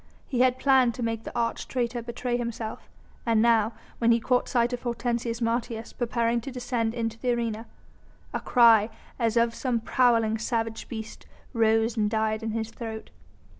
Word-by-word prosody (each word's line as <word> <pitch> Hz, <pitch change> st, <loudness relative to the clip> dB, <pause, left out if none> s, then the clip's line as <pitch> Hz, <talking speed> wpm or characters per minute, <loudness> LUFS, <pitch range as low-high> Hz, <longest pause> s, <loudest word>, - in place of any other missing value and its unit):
He 250 Hz, -, -2 dB
had 255 Hz, 0 st, +4 dB
planned 260 Hz, -3 st, +4 dB
to 250 Hz, -, -4 dB
make 225 Hz, -1 st, -2 dB
the -, -, -6 dB
arch 230 Hz, -1 st, -1 dB
traitor 240 Hz, -1 st, -2 dB
betray 240 Hz, +1 st, -3 dB
himself, 235 Hz, -2 st, -4 dB, 0.3 s
and 230 Hz, -2 st, +2 dB
now, 225 Hz, -1 st, +3 dB, 0.3 s
when 235 Hz, 0 st, +4 dB
he 235 Hz, -, +4 dB
caught 250 Hz, +2 st, +1 dB
sight 240 Hz, -1 st, +1 dB
of 245 Hz, -, -3 dB
Hortensius 235 Hz, -1 st, -2 dB
Martius 230 Hz, -1 st, -2 dB
preparing 235 Hz, -1 st, 0 dB
to 270 Hz, -, -6 dB
descend 245 Hz, -2 st, -2 dB
into 230 Hz, -1 st, -3 dB
the 250 Hz, -1 st, +1 dB
arena, 230 Hz, -1 st, -3 dB, 0.7 s
a -, -, -1 dB
cry 230 Hz, -3 st, +5 dB, 0.3 s
as 230 Hz, -1 st, +1 dB
of 230 Hz, 0 st, +3 dB
some 245 Hz, -1 st, -1 dB
prowling, 230 Hz, -2 st, +2 dB
savage 225 Hz, -1 st, -2 dB
beast 220 Hz, -2 st, -7 dB, 0.3 s
rose 225 Hz, 0 st, +2 dB
and 210 Hz, -1 st, +2 dB
died 220 Hz, 0 st, 0 dB
in 225 Hz, -, -3 dB
his 220 Hz, 0 st, -3 dB
throat. 225 Hz, -1 st, -7 dB
230 Hz, 170 wpm, -27 LUFS, 225-240 Hz, 0.7 s, cry